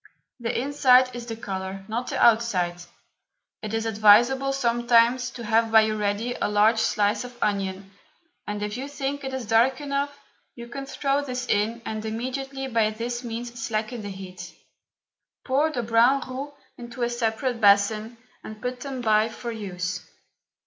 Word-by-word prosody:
The 235 -1 -2
inside 255 -2 +4
is 240 -1 -7
the 225 - -4
colour, 195 -2 -6
not 235 +3 -3
the - - -3
outside. 210 -7 +3 0.8
It 215 - -5
is 225 0 -1
advisable 225 +5 +5
sometimes 240 -1 +3
to 235 - -9
have 225 0 +2
by 220 0 +8
you 215 0 0
ready 210 +3 -1
a - - -1
large 210 +2 +3
slice 210 0 +1
of 250 -1 -10
onion, 195 -1 -2 0.6
and 210 0 -3
if 210 +2 -3
you 265 +2 -5
think 285 0 -4
it 265 - -4
is 260 -2 -4
dark 230 +5 +3
enough 285 0 -3 0.4
you 235 -1 -9
can 275 +2 -6
throw 275 +1 0
this 250 -2 -4
in 225 +3 0
and 215 0 -4
immediately 265 +4 -4
by 225 -4 +2
this 240 +3 -4
means 235 0 -6
slacken 220 +1 -2
the 205 - -6
heat. 190 -2 -9 0.9
Pour 285 +4 +2
the 250 -6 -3
brown 235 +4 +3
roux 265 +3 -6 0.3
into 240 0 -6
a - - +2
separate 235 +1 -1
basin, 215 +3 +3 0.3
and 215 0 -9
put 250 +1 -4
them 265 -1 -5
by 215 -1 +3
for 235 +1 -6
use. 185 -4 -4
230 Hz, 165 wpm, -25 LUFS, 215-255 Hz, 0.9 s, by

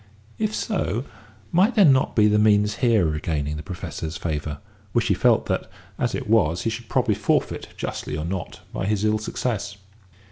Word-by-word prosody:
If 215 0 0
so, 135 - -1 0.5
might 195 +8 +3
there 205 -4 +7
not 135 -3 +4
be 105 -2 +5
the 105 0 +3
means 105 -1 +3
here 115 -7 +3
of 80 - -1
regaining 75 -1 -2
the 75 - -5
Professor's 85 -3 -6
favour, 75 -2 -3 0.4
which - - +1
he - - +5
felt - - +3
that, - - -2 0.3
as - - 0
it - - -4
was, 90 -7 +2
he 115 - 0
should 110 0 -7
probably - - +2
forfeit, - - 0
justly 75 - -4
or 75 - -3
not, 90 0 -5
by 95 - -2
his 105 0 +1
ill 110 0 +2
success? 105 -2 -3
105 Hz, 185 wpm, -24 LUFS, 80-115 Hz, 0.5 s, there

